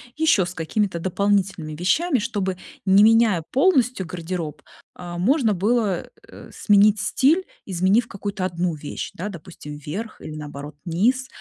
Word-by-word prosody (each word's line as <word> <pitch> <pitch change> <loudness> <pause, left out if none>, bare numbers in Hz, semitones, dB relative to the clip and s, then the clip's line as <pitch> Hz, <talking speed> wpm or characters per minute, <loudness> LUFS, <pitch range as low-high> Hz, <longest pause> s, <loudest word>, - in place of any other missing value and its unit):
еще 310 - +3
с 175 - -6
какими-то 180 +2 -1
дополнительными 190 -3 0
вещами, 265 - +1
чтобы, 205 -4 -2 0.3
не 195 +1 +6
меняя 220 -6 +4
полностью 255 - +2
гардероб, 165 -3 -5 0.3
а, 175 -1 -7
можно 230 - +2
было, 205 0 0 0.2
э, - - -13
сменить 205 0 +4
стиль, 305 - +2 0.2
изменив 190 +5 +2
какую-то 200 -2 -4
1 175 -1 -1
вещь, 150 -1 -6
да, 185 - -4
допустим, 170 -5 -9
вверх 190 +10 -7
или, 155 - -7
наоборот, 145 0 -8
низ. 235 +10 +1
190 Hz, 135 wpm, -23 LUFS, 170-225 Hz, 0.3 s, не